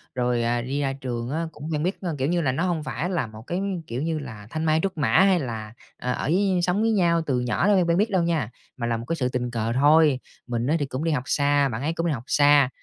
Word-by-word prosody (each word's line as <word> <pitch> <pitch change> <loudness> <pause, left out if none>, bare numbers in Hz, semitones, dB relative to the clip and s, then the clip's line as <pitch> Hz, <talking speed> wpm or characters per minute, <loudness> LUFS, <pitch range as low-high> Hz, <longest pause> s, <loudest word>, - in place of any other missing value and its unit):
rồi, 125 -1 +1
à, 120 +1 0
đi 135 +4 -2
ra 135 -1 0
trường 125 -3 -4
á, 165 +4 -2
cũng 150 +1 -8
quen 150 - -1
biết 185 +3 -2
a, 180 - -3
kiểu 135 0 0
như 175 0 +1
là, 135 -5 +1
nó 140 +7 -1
hông 175 -4 -1
phải 170 +3 -3
là 175 -10 -1
một 110 0 -11
cái, 175 - -2 0.3
kiểu 120 +3 -4
như 160 0 -1
là, 110 -7 -9
thanh 155 +4 -3
mai 155 0 +3
trúc 195 -3 -2
mã 150 - +1
hay 190 -2 +5
là, 110 -5 -5 0.2
ờ, 125 - -3
ở - - -4
với 185 +4 +2
sống 180 +4 +1
với 225 0 +2
nhau 170 -5 +3
từ 130 -4 0
nhỏ 125 +9 0
nên 205 - +5
quen 180 -2 +2
quen 170 - +3
biết 210 +4 +2
đâu 185 -3 +1
nha, 165 -10 0 0.3
mà 120 -2 -2
là 115 -1 0
một 115 - -7
cái 165 - -1
sự 125 -6 -1
tình 125 -1 -2
cờ 115 0 -1
thôi. 145 +1 +4 0.3
Mình 120 0 -2
á 155 - +2
thì 145 - 0
cũng 135 +2 -4
đi 165 - +1
học 140 -5 0
xa, 145 -1 +2
bạn 115 -1 -4
ấy 155 +4 -1
cũng 165 0 -2
đi - - +1
học 120 -4 -5
xa, 145 -2 +5
145 Hz, 295 wpm, -24 LUFS, 125-170 Hz, 0.3 s, hay